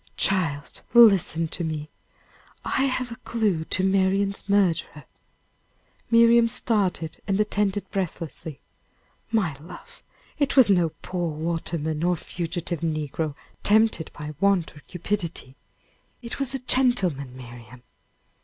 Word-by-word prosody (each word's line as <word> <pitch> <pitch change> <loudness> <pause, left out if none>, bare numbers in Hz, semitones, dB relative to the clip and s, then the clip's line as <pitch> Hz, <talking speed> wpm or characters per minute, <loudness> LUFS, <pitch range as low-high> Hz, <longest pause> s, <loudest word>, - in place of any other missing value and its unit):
"Child, 160 -7 0
listen 195 -8 +6
to 170 - -5
me! 155 -1 -4 0.7
I 265 - +1
have 255 -2 -2
a 230 - -7
clue 205 -9 -1
to 185 - 0
Marian's 195 +1 +1
murderer!" 175 -7 +1 1.0
Miriam 230 0 +6
started, 205 -9 -1
and 195 0 0
attended 205 -1 0
breathlessly. 165 -5 -5 0.7
"My 195 -10 +1
love, 170 +4 -13 0.4
it 285 -1 0
was 245 -6 +7
no 175 -4 +3
poor 175 -2 -2
waterman 160 0 -3
or 175 0 +2
fugitive 170 0 -4
negro, 155 -2 -2 0.3
tempted 215 -6 +3
by 150 0 -8
want 195 -5 +1
or - - -12
cupidity. 175 -7 -4 0.7
It 235 - -6
was 270 -1 0
a - - -1
gentleman, 180 - +1
Miriam." 120 0 -12
180 Hz, 115 wpm, -24 LUFS, 160-210 Hz, 1.0 s, was